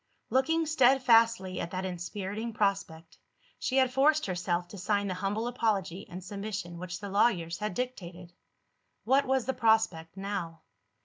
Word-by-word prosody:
Looking 320 +5 +2
steadfastly 230 -9 +4
at 170 - -4
that 185 +1 -4
inspiriting 195 +5 -4
prospect, 195 -6 -2 0.4
she 260 - -1
had 260 -1 +3
forced 300 +3 +3
herself 175 -1 -1
to 200 - -9
sign 205 +2 0
the 185 - -2
humble 200 +5 -2
apology 205 -6 -1
and 180 0 -8
submission 195 -3 -5
which 185 0 -6
the 200 -1 -6
lawyers 185 -5 +1
had 210 -3 -3
dictated. 180 -9 -5 0.7
What 265 +4 +3
was 265 -2 +1
the 265 - -1
prospect 220 -9 +1
now? 190 -5 -4
200 Hz, 145 wpm, -29 LUFS, 180-240 Hz, 0.7 s, steadfastly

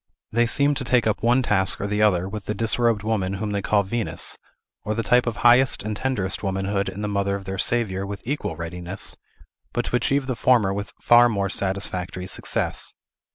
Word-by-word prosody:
They 120 +1 +2
seem 140 +4 +3
to 135 - -3
take 125 -1 +2
up 110 - 0
one 120 +3 +3
task 95 -4 +3
or - - -2
the 105 +1 -1
other 95 -5 +3
w 100 +3 -5
the 105 - -3
disrobed 115 0 +1
woman 105 -4 -1
whom 105 +2 -3
they 100 -1 -1
call 100 +1 +2
Venus, 115 +3 -2 0.5
or 110 - -2
the 115 - -1
type 125 +4 +3
of 115 - -1
highest 125 +2 +5
and 105 0 -3
tenderest 105 -6 -1
womanhood 100 0 -1
in 105 - -6
the - - -1
mother 100 -1 0
of 100 -1 -7
their 95 0 -5
Saviour 100 -5 0
with 100 0 -6
equal 145 +5 -3
readiness, 90 +2 -5 0.6
but 120 - -1
to - - -1
achieve 135 +2 +1
the 130 -1 -2
former 115 -6 +3
with 100 +1 -5
far 120 0 +6
more 100 -3 -1
satisfactory 95 -2 -2
success. - - -2
105 Hz, 200 wpm, -23 LUFS, 95-120 Hz, 0.6 s, far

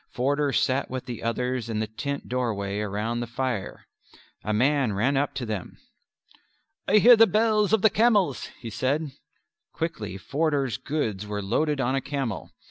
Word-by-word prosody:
Forder 145 +3 0
sat 135 +1 +1
with 130 0 -5
the 120 -3 -6
others 125 +1 -2
in 110 - -2
the 110 - 0
tent 140 +6 -5
doorway 105 -5 -2
round 105 +3 -2
the 120 - -4
fire. 120 -3 -3 0.6
A 110 - -2
man 130 +1 +2
ran 120 +8 +1
up 140 0 0
to 130 -3 -3
them. 105 -5 -5 1.1
"I 210 - +5
hear 240 +3 +8
the 225 0 +6
bells 215 -2 +2
of 220 -3 +3
the 220 - +6
camels," 210 - +2
he 115 -2 -7
said. 135 +7 -1 0.6
Quickly 110 - -4
Forder's 140 - -1
goods 110 -10 -3
were 105 -1 -3
loaded 145 +8 0
on 130 0 +1
a 135 - 0
camel. 135 -6 -4
130 Hz, 165 wpm, -26 LUFS, 110-150 Hz, 1.1 s, hear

